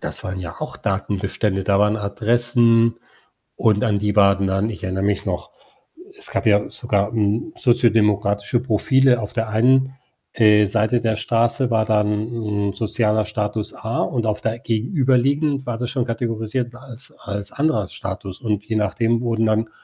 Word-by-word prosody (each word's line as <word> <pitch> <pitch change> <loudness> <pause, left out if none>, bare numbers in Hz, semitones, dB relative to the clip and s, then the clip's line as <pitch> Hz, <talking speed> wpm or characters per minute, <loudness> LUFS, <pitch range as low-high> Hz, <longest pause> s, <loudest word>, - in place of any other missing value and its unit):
Das - - -6
waren 95 0 -4
ja 85 -2 -7
auch - - -6
Datenbestände. 100 0 -2
Da 100 +1 +2
waren 105 +1 +2
Adressen 115 +2 +2 0.6
und 110 0 +2
an 105 -4 +1
die 105 0 -1
waren 100 -1 +4
dann 95 +3 0
ich 110 - -8
erinnere 95 +1 -2
mich 100 0 0
noch, - - -4 0.7
es 405 - -10
gab - - -2
ja 105 -1 +3
sogar, 105 -3 -1
hm, 110 +6 -1
soziodemokratische 105 -3 +2
Profile. 130 +2 +3
Auf 105 - -6
der 115 -2 -2
einen, 130 +4 +3 0.4
äh, 105 -2 +5
Seite 110 +3 +1
der 110 -2 0
Straße 120 +3 +1
war 110 -1 +2
dann 105 -1 +2 0.6
'n - - -5
sozialer 110 0 0
Status 105 0 -3
A 110 +1 -4
und 120 -3 -1
auf 105 -1 -1
der, 115 +1 -2
gegenüberliegend 135 - +1
war 120 -2 -3
das 120 0 -3
schon 130 -2 -1
kategorisiert 115 +1 -3
als 125 -2 -11
als 100 0 -6
anderer 140 - 0
Status 95 -1 -7
und 105 -3 -1
je 110 0 -3
nachdem 115 +2 0
wurden 115 -2 0
dann 110 +1 0
110 Hz, 165 wpm, -21 LUFS, 105-120 Hz, 0.7 s, äh